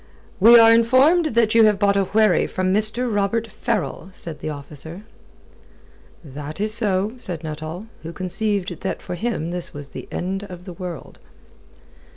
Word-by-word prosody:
"We 230 +5 +9
are 225 0 +8
informed 260 +9 +4
that 225 -2 +3
you 225 -1 +6
have 210 -2 +3
bought 200 0 +2
a 195 -1 +2
wherry 215 -2 +3
from 185 0 -1
Mr. 220 +3 +1
Robert 205 +3 0
Farrell," 215 -6 -3
said 165 -4 -7
the - - -4
officer. 150 +5 -8 1.2
"That 150 +3 -8
is 215 +1 0
so," 210 -2 0
said 175 -9 -5
Nuttall, 155 +5 -6 0.2
who 165 - -7
conceived 185 0 -2
that 190 - -3
for - - -7
him 175 -4 -3
this 175 -3 -3
was 145 -1 -8
the - - -9
end 190 +2 -3
of 180 -2 -11
the 180 - -8
world. 180 -2 -8
195 Hz, 165 wpm, -22 LUFS, 170-220 Hz, 1.2 s, We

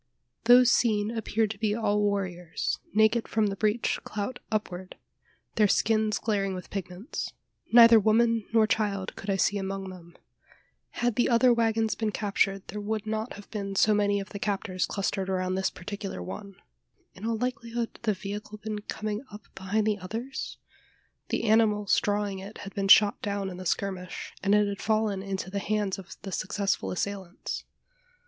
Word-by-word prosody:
Those 245 +1 +7
seen 215 -2 +2
appeared 225 -1 0
to 205 - -8
be 210 -1 +1
all 210 -2 +1
warriors, 185 -4 -1
naked 220 +2 +3
from 220 -1 +1
the 200 -1 -1
breech 215 +3 +1
clout 215 +4 -4
upward, 190 -4 -3 0.6
their 210 -2 +5
skins 215 +1 +2
glaring 200 -3 -1
with 180 - -8
pigments. 190 - -5 0.4
Neither 230 -1 +9
woman 225 +1 +3
nor 225 -1 +5
child 205 -3 -1
could 205 - -7
I 195 - +2
see 200 +2 +2
among 195 0 -4
them. 175 -2 -13 0.9
Had 240 -3 +1
the 245 - +3
other 245 +1 +5
waggons 225 -1 +1
been 220 -2 -1
captured, 195 -2 0
there 210 +3 -4
would 215 +1 -2
not 220 +2 -3
have 205 0 -11
been 200 -2 -4
so 215 +2 +4
many 205 -1 +2
of 195 - -6
the 200 - -7
captors 195 -2 -1
clustered 195 -1 -2
around 185 -1 0
this 190 0 +1
particular 195 - -6
one. 95 - -7 0.6
In 185 - -13
all 225 0 0
likelihood, 235 -1 -3
the 220 -2 +1
vehicle 205 +2 -6
had - - -32
been 215 -1 -3
coming 215 0 -4
up 210 0 -10
behind 205 +3 -1
the 210 -1 +1
others? 230 +8 -5 0.7
The - - -1
animals 215 -2 +3
drawing 205 -1 -1
it 195 +3 -9
had 200 - -8
been 195 -2 -1
shot 205 +1 +7
down 200 -1 -2
in 180 - -8
the 185 -1 -4
skirmish, 185 -1 -3
and 200 +2 +3
it 210 0 +4
had 200 -1 -4
fallen 215 -3 +1
into 190 -1 -4
the 200 - -1
hands 205 -1 -1
of 190 -1 -11
the 195 - -6
successful 190 - -1
assailants? 190 - -4
205 Hz, 175 wpm, -28 LUFS, 195-220 Hz, 0.9 s, Neither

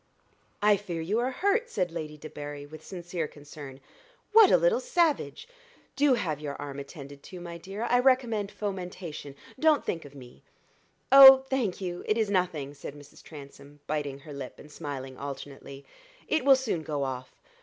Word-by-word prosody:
"I 210 -1 +5
fear 180 -4 -5
you 195 +8 0
are 245 +2 0
hurt," 405 - 0
said 180 -3 -1
Lady 155 -2 -6
Debarry, 145 -1 -8
with 155 +1 -12
sincere 175 -3 -5
concern. 145 -2 -11 0.5
"What 440 -3 +8
a - - +6
little - - +3
savage! 350 -10 0 0.5
Do 280 -2 +4
have 155 - -2
your 145 -2 -5
arm 140 -1 -6
attended 140 -1 -10
to, 180 +4 -10
my 170 -1 -8
dear 195 +5 -6
I 245 +1 +3
recommend 245 -6 +2
fomentation 180 -7 -6 0.2
don't 310 -1 +3
think 165 - -2
of 145 0 -13
me." 125 -3 -13 0.7
"Oh, 270 -1 +11
thank 230 -9 -1
you, 175 -1 -4
it 215 - +2
is 215 -3 0
nothing," 170 -7 -1
said 145 0 -9
Mrs. 145 0 -15
Transome, 145 -1 -13
biting 145 -2 -3
her 150 +1 -10
lip 140 -2 -7
and 150 - -14
smiling 135 -4 -7
alternately; 140 0 -8 0.4
"it 315 - +1
will 270 0 +7
soon 245 -10 -2
go 150 -2 -3
off. 130 -1 -5
165 Hz, 170 wpm, -28 LUFS, 145-225 Hz, 0.7 s, Oh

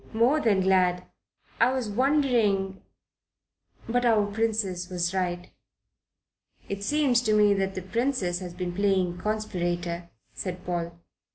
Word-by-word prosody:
"More 245 +7 +3
than 205 -6 +3
glad. 185 -1 +2 0.5
I 235 +2 +5
was 255 -4 -2
wondering... 220 -6 +1 1.1
but 245 +1 +1
our 220 -4 +4
dear 205 - -7
Princess 210 -5 -1
was 180 0 -1
right." 180 -2 -2 1.2
"It 200 0 -5
seems 270 -1 +2
to 220 -3 +1
me 210 -1 +5
that 195 -1 -1
the 185 - -4
Princess 205 -4 -1
has 180 -2 -8
been 180 -1 -4
playing 190 -2 +1
conspirator," 175 -5 -2 0.2
said 180 -1 -6
Paul. 170 -1 -3
195 Hz, 130 wpm, -26 LUFS, 180-225 Hz, 1.2 s, I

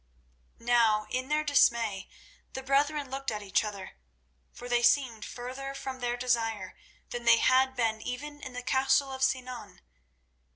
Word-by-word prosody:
Now 230 -3 +2
in 255 +1 -2
their 305 0 +1
dismay 235 -8 +2 0.4
the 265 - -6
brethren 280 +1 +1
looked 270 0 -3
at 210 -1 -4
each 195 +1 +1
other, 200 - -7 0.5
for 245 - -10
they 240 -1 +2
seemed 240 -2 +2
further 260 +3 -7
from 265 -1 -6
their 245 -1 -2
desire 230 -3 -1 0.4
than 240 0 -5
they 235 0 +7
had 260 +2 +3
been 225 -3 0
even 290 +5 -6
in 260 - -8
the 250 0 -6
castle 265 +1 +2
of 265 0 -7
Sinan. 255 -2 -2
250 Hz, 155 wpm, -29 LUFS, 235-265 Hz, 0.5 s, they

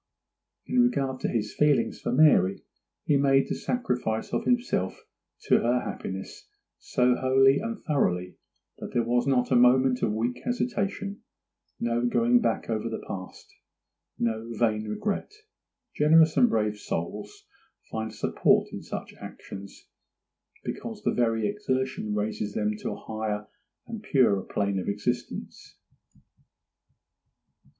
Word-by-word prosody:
In 250 - +1
regard 135 - +1
to - - -1
his 105 -3 -2
feelings 145 -5 +2
for - - -2
Mary, 125 -9 +4 0.4
he 145 - +3
made 135 -1 +3
the - - -2
sacrifice 125 - -2
of - - -1
himself 245 - 0 0.5
to - - +4
her 120 +1 +1
happiness 95 0 -6 0.3
so 125 0 +2
wholly 135 +2 +4
and 230 -1 -4
thoroughly 90 - 0 0.4
that - - -7
there 120 - +2
was 120 +3 +1
not 125 -2 +2
a - - +4
moment 125 +1 +5
of 105 - +1
weak 115 +3 -2
hesitation—no 200 - -3
going 120 0 +3
back 115 - 0
over 115 0 -2
the 110 - -5
past—no 110 +4 -7
vain 110 -2 0
regret. 200 - -2 0.6
Generous 160 +1 +5
and 245 - +5
brave 105 -1 0
souls 410 - -5 0.5
find 110 0 -3
a - - -12
support - - +2
in - - -5
such - - -7
actions, 100 0 -10 0.8
because - - -6
the - - +1
very 115 -2 +1
exertion 130 - -2
raises 105 0 -2
them 105 0 0
to - - -4
a - - -4
higher 105 -1 -4 0.4
and 225 -2 -7
purer 130 - +3
plane 100 0 -1
of 90 - -3
existence. 105 +5 -4
120 Hz, 130 wpm, -27 LUFS, 105-140 Hz, 0.8 s, moment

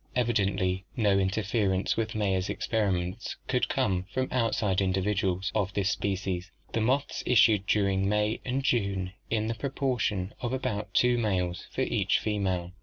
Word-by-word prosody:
Evidently 100 -6 +1
no 100 -4 +3
interference 95 0 0
with 110 -1 -2
Mayer's 95 -3 0
experiments 100 -1 -1
could 125 -1 +1
come 95 -9 0
from 130 +2 0
outside 110 -5 +1
individuals 95 0 0
of 100 -3 0
this 100 0 +1
species. 95 -1 -2 0.2
The 115 - +1
moths 130 +5 0
issued 110 -4 +4
during 100 -2 +2
May 105 +1 +1
and 130 +2 -1
June 100 -7 0 0.2
in 110 -1 0
the 115 - -1
proportion 115 -7 -1
of 120 0 -2
about 105 -6 -3
two 125 -1 +4
males 90 -5 -1
for - - -3
each - - +2
female. 95 -4 -1
105 Hz, 145 wpm, -28 LUFS, 95-115 Hz, 0.2 s, issued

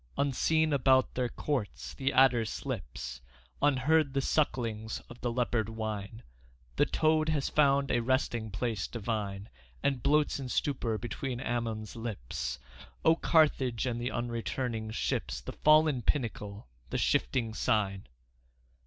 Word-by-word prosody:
Unseen 155 +3 +2
about 130 -1 +4
their 125 -1 -1
courts 130 -8 -3
the 135 0 -1
adder 130 -3 +5
slips, 60 - -5 0.4
Unheard 145 +1 +3
the - - +3
sucklings 115 -7 0
of 120 - -12
the 120 - -1
leopard 115 -3 0
whine; 110 -1 -5 0.5
The - - +4
toad 155 0 +2
has 150 -3 0
found 140 -2 +3
a 120 - +3
resting 120 -2 0
place 105 -1 -2
divine 105 -3 -3 0.4
And 135 -3 +1
bloats 150 +1 +2
in 130 -2 -5
stupor 125 -5 0
between 125 +2 -4
Amnion's 115 -5 -3
lips. 110 - -4 0.5
O 160 - +6
Carthage 140 -8 +2
and 120 -2 -2
the 120 - -1
unreturning 115 -1 -3
ships, 110 - -2
The - - -7
fallen 155 -3 +4
pinnacle, 105 -5 -2 0.2
the - - -1
shifting 115 -4 +1
Sign! 100 -4 0
120 Hz, 130 wpm, -30 LUFS, 110-140 Hz, 0.5 s, O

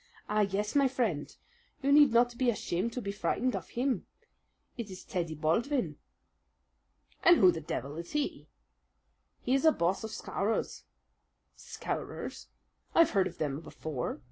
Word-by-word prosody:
"Ah, 210 0 +1
yes, 205 +1 0
my 280 -1 +5
friend! 230 - -1 0.5
You 280 - +2
need 290 -2 +7
not 240 +1 +3
be 250 0 +2
ashamed 210 -1 -1
to 250 - -4
be 200 - -2
frightened 250 +4 0
of - - -5
him. 250 -3 -1 0.7
It 230 -4 -5
is 185 -1 -9
Teddy 170 -3 -3
Baldwin." 165 - 0 1.2
"And 345 0 +7
who 185 -2 +7
the 165 - -5
devil 145 0 -4
is 170 0 -7
he?" 295 -1 -2 1.0
"He 250 - +1
is 270 - +2
a 320 - +7
boss 185 - 0
of 220 - -4
Scowrers." 215 0 -2 0.7
"Scowrers! - - -5 0.5
I've 335 -1 +6
heard 195 -3 +3
of 170 - -9
them 145 -2 -2
before. 155 -5 -5
210 Hz, 150 wpm, -31 LUFS, 170-255 Hz, 1.2 s, need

